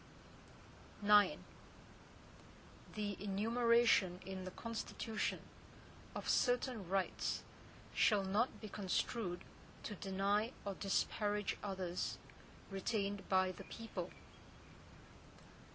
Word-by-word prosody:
IX 205 Hz, -2 st, +7 dB, 1.6 s
The 205 Hz, -2 st, -2 dB
enumeration 225 Hz, -2 st, +4 dB
in 190 Hz, -1 st, -5 dB
the -, -, -3 dB
Constitution, 225 Hz, +1 st, -3 dB, 0.7 s
of -, -, -4 dB
certain 245 Hz, -6 st, +2 dB
rights, 190 Hz, -1 st, 0 dB, 0.5 s
shall 210 Hz, -3 st, +4 dB
not 205 Hz, +6 st, +1 dB
be 215 Hz, -, -6 dB
construed 195 Hz, -1 st, -1 dB, 0.4 s
to 210 Hz, -, -4 dB
deny 200 Hz, +4 st, +1 dB
or 200 Hz, -, -1 dB
disparage 205 Hz, +1 st, 0 dB
others 185 Hz, -3 st, -2 dB, 0.5 s
retained 200 Hz, 0 st, -1 dB
by 185 Hz, -1 st, +4 dB
the 180 Hz, -, -10 dB
people. 225 Hz, 0 st, -5 dB
205 Hz, 85 wpm, -38 LUFS, 190-220 Hz, 1.6 s, IX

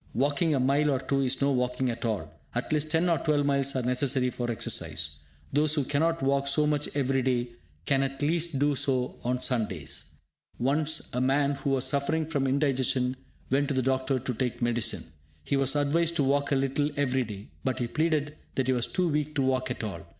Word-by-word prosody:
Walking 145 Hz, +4 st, +2 dB
a -, -, +1 dB
mile 140 Hz, +3 st, +3 dB
or 135 Hz, -, +2 dB
two 135 Hz, +1 st, 0 dB
is 135 Hz, +1 st, +1 dB
no 140 Hz, -, +3 dB
walking 125 Hz, 0 st, 0 dB
at 115 Hz, -, -5 dB
all; 95 Hz, -9 st, -2 dB, 0.2 s
at 120 Hz, +5 st, -1 dB
least 150 Hz, 0 st, +1 dB
ten 165 Hz, +3 st, +2 dB
or 170 Hz, -2 st, +2 dB
twelve 150 Hz, -2 st, +1 dB
miles 140 Hz, -1 st, +1 dB
are 130 Hz, -, 0 dB
necessary 125 Hz, 0 st, +1 dB
for 120 Hz, -1 st, -3 dB
exercise. 80 Hz, -8 st, -2 dB, 0.3 s
Those 150 Hz, +2 st, +3 dB
who 145 Hz, -, +1 dB
cannot 160 Hz, +3 st, 0 dB
walk 140 Hz, +1 st, +1 dB
so 150 Hz, +2 st, +2 dB
much 150 Hz, -1 st, 0 dB
every 135 Hz, -1 st, +1 dB
day 125 Hz, -1 st, 0 dB, 0.4 s
can 135 Hz, +5 st, +2 dB
at 135 Hz, 0 st, -2 dB
least 165 Hz, 0 st, 0 dB
do 145 Hz, +2 st, +2 dB
so 130 Hz, -2 st, 0 dB
on 125 Hz, +1 st, -1 dB
Sundays. 105 Hz, -, -2 dB, 0.4 s
Once 150 Hz, +5 st, 0 dB
a 125 Hz, -, 0 dB
man 140 Hz, +2 st, +2 dB
who 140 Hz, 0 st, -3 dB
was 135 Hz, -1 st, +2 dB
suffering 140 Hz, +4 st, 0 dB
from 140 Hz, -4 st, -1 dB
indigestion 130 Hz, -2 st, +1 dB, 0.4 s
went 140 Hz, +2 st, +2 dB
to 140 Hz, -, -1 dB
the 130 Hz, -, +1 dB
doctor 130 Hz, +1 st, +1 dB
to 125 Hz, 0 st, -3 dB
take 125 Hz, +1 st, -2 dB
medicine. 120 Hz, -2 st, 0 dB, 0.4 s
He 140 Hz, -, 0 dB
was 135 Hz, 0 st, +2 dB
advised 160 Hz, +4 st, +2 dB
to 145 Hz, -, +2 dB
walk 140 Hz, +1 st, +1 dB
a -, -, +4 dB
little 135 Hz, +2 st, +1 dB
every 130 Hz, -2 st, +1 dB
day, 105 Hz, -3 st, -9 dB
but 130 Hz, -3 st, 0 dB
he 120 Hz, -, -1 dB
pleaded 155 Hz, +2 st, 0 dB, 0.2 s
that 135 Hz, -, +1 dB
he 130 Hz, -, +2 dB
was 120 Hz, -1 st, 0 dB
too 180 Hz, -1 st, 0 dB
weak 150 Hz, -1 st, -1 dB
to 140 Hz, -, +2 dB
walk 130 Hz, 0 st, +1 dB
at 125 Hz, -, -4 dB
all. 100 Hz, -6 st, -4 dB
135 Hz, 210 wpm, -28 LUFS, 125-145 Hz, 0.4 s, a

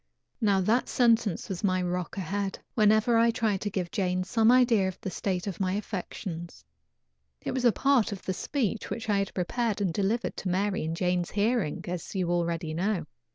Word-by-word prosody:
Now 200 Hz, -3 st, +3 dB
that 225 Hz, +7 st, +1 dB
sentence 230 Hz, -6 st, +2 dB
was 190 Hz, -1 st, -5 dB
my 185 Hz, -2 st, +2 dB
rock 180 Hz, 0 st, -3 dB
ahead, 195 Hz, +2 st, -2 dB, 0.2 s
whenever 220 Hz, +1 st, +4 dB
I 230 Hz, +1 st, +5 dB
tried 220 Hz, -4 st, 0 dB
to 205 Hz, -, -1 dB
give 185 Hz, -3 st, -3 dB
Jane 185 Hz, -2 st, 0 dB
some 220 Hz, +4 st, +3 dB
idea 240 Hz, -6 st, +4 dB
of 185 Hz, -, -5 dB
the 190 Hz, -, -4 dB
state 180 Hz, 0 st, -2 dB
of 195 Hz, -4 st, -5 dB
my 185 Hz, -1 st, 0 dB
affections. 185 Hz, -4 st, -5 dB, 0.8 s
It -, -, -3 dB
was 255 Hz, -1 st, -1 dB
a 240 Hz, -, +7 dB
part 260 Hz, 0 st, +2 dB
of 200 Hz, -2 st, -6 dB
the 185 Hz, -, -1 dB
speech 225 Hz, +1 st, -2 dB
which 230 Hz, -, -4 dB
I 200 Hz, -, +3 dB
had 195 Hz, -, -2 dB
prepared 220 Hz, +4 st, -1 dB
and 190 Hz, -5 st, 0 dB
delivered 205 Hz, +6 st, 0 dB
to 190 Hz, -, -3 dB
Mary 195 Hz, +1 st, 0 dB
in 160 Hz, +1 st, -2 dB
Jane's 180 Hz, 0 st, 0 dB
hearing, 210 Hz, -6 st, 0 dB
as 175 Hz, +2 st, -5 dB
you 180 Hz, -2 st, 0 dB
already 170 Hz, -2 st, -1 dB
know. 180 Hz, 0 st, -1 dB
195 Hz, 195 wpm, -28 LUFS, 180-220 Hz, 0.8 s, a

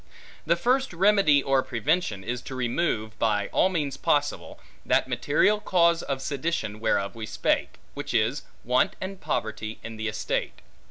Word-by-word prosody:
The 170 Hz, -, +4 dB
first 255 Hz, +6 st, +1 dB
remedy 185 Hz, -6 st, +4 dB
or 135 Hz, -1 st, +3 dB
prevention 120 Hz, -, -1 dB
is 120 Hz, +2 st, -3 dB
to 130 Hz, -, -8 dB
remove, 120 Hz, -4 st, -1 dB
by 105 Hz, -3 st, +1 dB
all 185 Hz, -, +3 dB
means 150 Hz, -7 st, -2 dB
possible, -, -, -1 dB, 0.2 s
that -, -, +2 dB
material 205 Hz, +8 st, +2 dB
cause 170 Hz, -4 st, +3 dB
of 135 Hz, -1 st, -3 dB
sedition 140 Hz, -7 st, -2 dB
whereof 100 Hz, -3 st, 0 dB
we 110 Hz, -2 st, -6 dB
spake; -, -, 0 dB, 0.2 s
which -, -, -5 dB
is, -, -, +1 dB, 0.2 s
want 125 Hz, +2 st, +2 dB
and 190 Hz, 0 st, -6 dB
poverty 110 Hz, 0 st, -3 dB
in 115 Hz, -1 st, -7 dB
the 110 Hz, 0 st, -3 dB
estate. 110 Hz, -, -3 dB
135 Hz, 155 wpm, -26 LUFS, 110-170 Hz, 0.2 s, The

